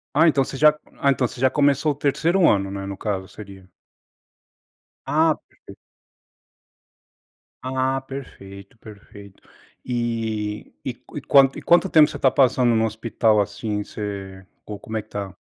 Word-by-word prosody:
Ah, 160 +4 +5
então, 145 -4 +3
você 135 - -7
já 150 +1 +5 0.2
ah, 140 - +2
então 135 -1 0
você 125 +1 -7
já 130 +1 +3
começou 145 +1 +2
o - - -16
3º 165 +6 +1
ano, 100 -2 +1
né, 100 0 -6
no 100 0 -6
caso, 100 -3 -3
seria. 95 -3 -13 1.3
Ah, 155 +1 +2
perfeito! - - -16 1.9
Ah, 130 +1 -1
perfeito, 100 -7 -11
perfeito. 100 -2 -14 0.5
E 115 -3 -3
e - - -3
qu - - -13 0.4
e - - -7
quanto 175 +3 +4
tempo 155 -2 +6
você - - -7
tá 130 - +3
passando 125 -3 +3
no 110 0 +2
hospital, 110 0 +1
assim, 105 +1 -2
você, 100 -2 -7 0.2
o 105 -1 -8
como 110 +2 -6
é - - -2
que 110 - -32
tá? 100 -2 -6
115 Hz, 150 wpm, -22 LUFS, 100-135 Hz, 1.9 s, tempo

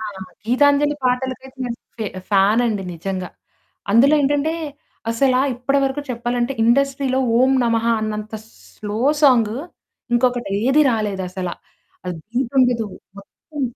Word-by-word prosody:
ఆ! - - -5 0.4
'గీతాంజలి' 285 +3 +3
పాటలకైతే 260 +1 -2
నేను 235 -1 -4 0.2
ఫ - - -9 0.3
ఫానండి 205 +1 +3
నిజంగా. 185 +2 -4 0.6
అందులో 265 +8 +5
ఏంటంటే 290 +3 +1 0.6
అసల 255 +2 +2 0.2
ఇప్పటి 265 +3 0
వరకు 270 +2 -1
చెప్పాలంటే, 240 +1 -1
ఇండస్ట్రీలో 265 +2 +2 0.2
ఓం 260 +1 +4
నమః 230 -1 +1
అన్నంత 215 0 -4 0.4
స్లో 210 +1 -5 0.2
సాంగ్ 235 -6 +4 0.6
ఇంకొకటి 245 -3 +1 0.2
ఏది 280 +4 +5
రాలేదసల. 190 -5 -2 0.6
అది 180 -1 -4
బీటుండదు 245 -2 +1 0.3
మొత్తం 285 +8 -9
245 Hz, 110 wpm, -20 LUFS, 215-270 Hz, 0.6 s, అందులో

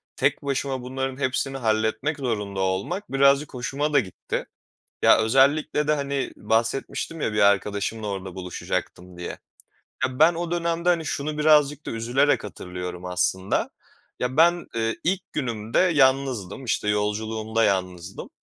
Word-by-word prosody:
tek - - +1
başıma 135 -1 -2
bunların 130 +1 -4
hepsini 135 0 -1
halletmek 110 +5 0
zorunda 105 -7 -2
olmak 95 - -2
birazcık 140 +1 +3
hoşuma 140 +4 -2
da 145 - +6
gitti. 95 -7 -4 0.6
Ya - - +7
özellikle 140 +6 +3
de, 150 - +4
hani, 140 -1 -2
bahsetmiştim 135 +7 -1
ya 110 - -1
bir 105 - 0
arkadaşımla 100 +2 +1
orada 95 -2 -5
buluşacaktım 90 -1 -5
diye. 90 - -5 0.8
Ya, 130 0 -2
ben 160 +3 +6
o 170 0 -3
dönemde, 170 0 0
hani, 170 -2 +3
şunu 150 +1 -3
birazcık 150 -1 +4
da - - -3
üzülerek 120 +6 +1
hatırlıyorum 90 -2 -7
aslında. 90 +1 0 0.5
Ya, 125 +1 -1
ben, 175 +2 +4
ııı, 115 0 0
ilk 185 +2 -1
günümde 115 -6 -2
yalnızdım, 135 - +2
işte, 110 -3 -1
yolculuğumda 110 +2 0
yalnızdım 90 -1 -2
125 Hz, 135 wpm, -24 LUFS, 105-145 Hz, 0.8 s, Ya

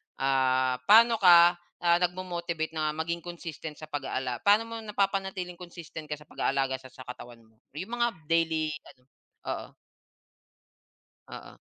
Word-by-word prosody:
Ah, 130 -1 +1
pano 230 +1 +7
ka, 175 -1 +7 0.2
ah, 170 0 +4
nagmo-motivate 175 -3 -2
na 155 -1 -2
maging 165 +2 -2
consistent 165 -3 -8
sa 155 +1 -11
pag-aala 130 -4 -3
pano 205 +2 +6
mo 230 0 -7
napa-panatiling 195 -4 -2
consistent 170 -3 -9
ka 150 - -3
sa 150 - -12
pag-aalaga 135 -2 -1
sa 130 - -14
sa 130 - -12
katawan 120 -1 -10
mo? 110 0 -27 0.2
Yung 210 +10 -5
mga 235 -1 +1 0.2
daily 160 -2 +2 0.2
ano 125 - -32 0.5
oo. - - -5 1.5
Oo. - - -11
165 Hz, 140 wpm, -28 LUFS, 135-180 Hz, 1.5 s, pano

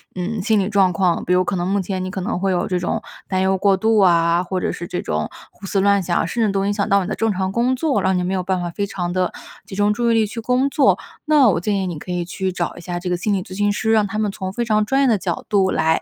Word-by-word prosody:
嗯， 195 +4 -3
心 220 +2 +2
理 195 0 0
状 195 -4 +3
况。 175 -1 +1
比 180 - +1
如 185 0 +4
可 190 - -2
能 175 +1 -1
目 200 0 +1
前 185 0 -3
你 - - -4
可 190 +1 -4
能 180 - -2
会 195 +1 0
有 175 -1 0
这 180 -2 -1
种 195 +5 -2 0.3
担 185 -1 0
忧 190 0 +2
过 195 +1 +3
度 220 +2 +2
啊， 170 -2 +4
或 185 0 -3
者 - - -1
是 175 - -6
这 180 - -3
种 75 0 -2 0.2
胡 195 - -13
思 195 0 0
乱 200 0 +3
想 175 -1 -1
啊， - - +1
甚 230 +6 0
至 210 - +1
都 195 0 0
影 205 - +1
响 200 -1 -1
到 200 -1 +3
你 180 - -5
的 - - -2
正 225 0 0
常 190 0 -2
工 240 +5 +1
作， 290 +1 0
让 190 -1 +1
你 180 - 0
没 185 - -1
有 185 - 0
办 185 0 -1
法 175 - -3
非 200 +4 -2
常 175 -3 -3
的 185 0 -1 0.3
集 - - -9
中 205 +1 +2
注 235 +1 0
意 - - +3
力 225 -1 +3
去 220 +3 -6
工 250 +4 +1
作， 275 -1 +3 0.3
那 295 -6 +5
我 175 - +1
建 205 +4 -1
议 185 - -2
你 165 -4 -5
可 180 - -7
以 175 -1 -1
去 190 +2 -3
找 175 -1 -3
一 175 - -9
下 175 0 -4
这 180 - -4
个 180 - 0
心 205 +3 -1
理 190 -2 -1
咨 185 - -10
询 205 0 +2
师， 220 +1 0
让 215 -2 +3
他 215 +2 -5
们 210 -2 0
从 190 -1 -5
非 240 - -1
常 215 -2 +1
专 270 +5 +1
业 275 - +4
的 225 -4 +3
角 180 -2 -4
度 195 -3 +2
来 160 0 +1
190 Hz, 345 characters per minute, -20 LUFS, 180-215 Hz, 0.3 s, 那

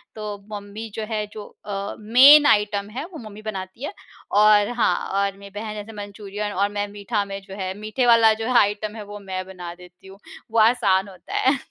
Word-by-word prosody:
तो 210 -1 -5
मम्मी 210 +2 -7
जो 220 - -3
है 215 -2 -1
जो 210 -1 -8 0.2
अ, 200 0 -4
मेन 265 +7 +8
आइटम 205 -4 +2
है 265 +8 -5
वो - - -7
मम्मी 210 +1 -11
बनाती 195 +1 -6
है, 295 - -4 0.4
और 210 0 +5
हाँ 230 - +3 0.2
और 200 0 -1
मेरी 200 0 -12
बहन 215 0 -5
जैसे 210 +1 -7
मंचूरियन 205 0 -6
और 200 +2 +1
मैं 205 0 -2
मीठा 205 +1 -2
में 195 0 -6
जो 195 0 -11
है, 190 -2 -3
मीठे 215 +4 -1
वाला 230 -2 +6
जो 225 +1 -5
है 250 -1 +3
आइटम 210 +1 0
है 215 - -7
वो 205 0 -9
मैं 190 -2 -5
बना 180 -2 -8
देती 180 +1 -17
हूँ, 195 +1 -14 0.3
वो 225 - +2
आसान 205 -4 +3
होता 185 - -12
है। 265 +2 +3
205 Hz, 210 wpm, -23 LUFS, 200-220 Hz, 0.4 s, मेन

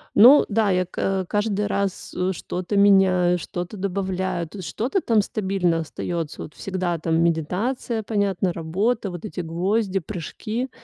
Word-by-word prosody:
Ну 250 +8 +8
да, 215 -1 +2
я 185 -1 +2
ка 190 +1 -1
каждый 210 0 0
раз, 200 -2 -2
э, 185 +1 0
что-то 180 +3 -3
меняю, 185 -3 +5
что-то 175 +5 -5
добавляю, 185 -2 -2
то 195 +4 -9
что-то 250 - -1
там 225 -3 +3
стабильно 190 -5 0
остаётся. 165 0 -4
Вот 155 - -10
всегда 185 -3 -2
там 165 +1 +1
медитация, 205 - -1
понятно, 195 -4 0
работа, 195 +7 -1
вот 175 0 -7
эти 200 - -6
гвозди, 190 +4 0
прыжки. 215 - -5
190 Hz, 145 wpm, -23 LUFS, 175-210 Hz, -, Ну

